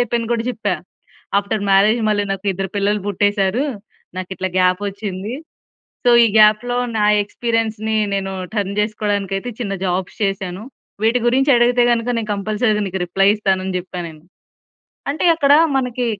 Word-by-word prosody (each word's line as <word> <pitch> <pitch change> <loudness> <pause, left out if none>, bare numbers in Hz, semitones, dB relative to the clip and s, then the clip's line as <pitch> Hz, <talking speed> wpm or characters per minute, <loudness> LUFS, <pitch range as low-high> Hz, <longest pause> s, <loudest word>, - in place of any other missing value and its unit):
అయిపోయింది 235 -1 -1
కూడా 230 -1 0
చెప్పా. 210 -5 -2 0.6
ఆఫ్టర్ 205 +1 -2
మ్యారేజ్ 210 +4 +4
మళ్ళి 205 -1 +1
నాకు 195 +1 -6
ఇద్దరు 190 +1 -4
పిల్లలు 205 +1 +1
పుట్టేసారు. 205 +3 +1 0.5
నాకిట్లా 185 0 -4
గ్యాప్ 185 +1 +3
వచ్చింది. 200 +2 -5 0.7
సో, 245 - +5
ఈ - - +5
గ్యాప్‌లో 215 +3 +4 0.2
నా 210 - +2 0.2
ఎక్స్‌పీరియన్స్‌ని 220 0 -2 0.2
నేను 195 -1 -2 0.2
టర్న్ 200 -2 -2
చేసుకోడానికయితే 205 0 -2
చిన్న 200 -4 -3
జాబ్స్ 180 +1 -2
చేశాను. 195 0 -3 0.4
వీటి 230 +3 +3
గురించి 270 +4 +2
అడిగితే 240 +1 +3
గనుక 235 0 0
నేను 220 -2 -3
కంపల్సరీ 210 +2 0
నీకు 190 0 -4
రిప్లయ్ 195 +3 +3
ఇస్తాను 190 -3 0
అని 190 -1 -3
చెప్పా 180 0 -6
నేను. 155 -2 -12 0.9
అంటే 310 - -2
అక్కడ 285 -3 +4 0.2
మనకి 250 -1 -2
205 Hz, 145 wpm, -19 LUFS, 195-230 Hz, 0.9 s, సో